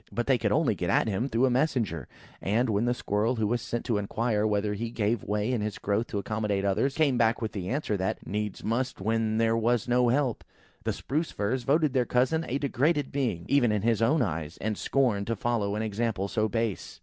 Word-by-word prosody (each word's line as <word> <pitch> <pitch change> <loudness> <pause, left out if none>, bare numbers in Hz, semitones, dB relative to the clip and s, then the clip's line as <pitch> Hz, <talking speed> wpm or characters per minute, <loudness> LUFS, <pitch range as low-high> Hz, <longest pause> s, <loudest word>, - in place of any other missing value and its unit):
But 120 - -2
they 130 -3 +3
could 105 -3 0
only 145 -2 +3
get 90 -3 -3
at - - +3
him 110 +6 -1
through 120 +2 +2
a 130 - +2
messenger; 120 - 0 0.3
and, 115 +4 +1
when 105 +3 +1
the 120 - +2
Squirrel 110 +2 0
who 110 -2 0
was 120 +3 0
sent 120 - -4
to 115 -5 +1
inquire 110 +1 0
whether 105 0 0
he 115 +3 -3
ever 115 - -10
gave 110 0 0
way 105 +3 -1
in 120 - 0
his 105 -1 -3
growth 105 +4 -1
to 105 - -4
accommodate 105 -1 -1
others, 135 +8 +1
came 140 -6 +2
back 115 -1 +3
with 110 -2 -3
the 95 -3 -4
answer 135 -5 -1
that, 95 0 -2
"Needs 105 0 -3
must 125 +4 -1
when 110 +2 0
there 115 0 +3
was 115 +1 +1
no 125 0 +3
help!" 130 -1 0 0.4
the - - +1
Spruce 155 +4 -2
firs 115 +6 -1
voted 145 +2 +2
their 125 -3 +2
cousin 130 +6 +2
a 130 - 0
degraded 145 +2 0
being 120 -12 -1
even 135 -5 +3
in 105 -2 0
his 115 -1 +2
own 145 +8 +3
eyes, 80 0 -4
and 110 +1 -2
scorned 115 -7 +1
to 115 - 0
follow 105 -2 -1
an 110 - -1
example 110 -2 -1
so 110 +1 0
base. 115 -2 -3
115 Hz, 230 wpm, -28 LUFS, 105-125 Hz, 0.4 s, they